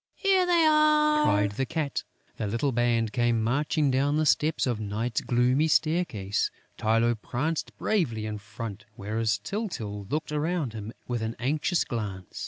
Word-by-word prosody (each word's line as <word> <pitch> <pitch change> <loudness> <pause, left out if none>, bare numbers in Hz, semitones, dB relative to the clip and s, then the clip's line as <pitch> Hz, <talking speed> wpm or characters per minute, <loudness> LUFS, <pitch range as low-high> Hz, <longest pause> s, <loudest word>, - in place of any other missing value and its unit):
"Here 385 -2 +3
they 340 -2 +4
are!" 305 0 +4
cried 100 0 +2
the 135 +6 -2
Cat. 155 -4 -2 0.4
The 110 - -2
little 115 +7 0
band 115 -2 +1
came 120 -2 +2
marching 145 +4 +1
down 140 +3 +2
the 155 - +2
steps 155 +1 +2
of 120 -4 -1
Night's 110 +2 -2
gloomy 125 +5 +2
staircase. 155 - +1 0.3
Tylô 115 +2 +2
pranced 155 +6 -3
bravely 125 - 0
in 105 -1 -4
front, 105 0 -7
whereas 110 +1 -1
Tyltyl 110 - -4
looked 150 +2 -2
around 150 -4 -1
him 110 0 -6 0.2
with 120 -2 -2
an 110 +1 -3
anxious 150 +7 +1
glance. 100 -6 -5
120 Hz, 155 wpm, -27 LUFS, 110-155 Hz, 0.4 s, they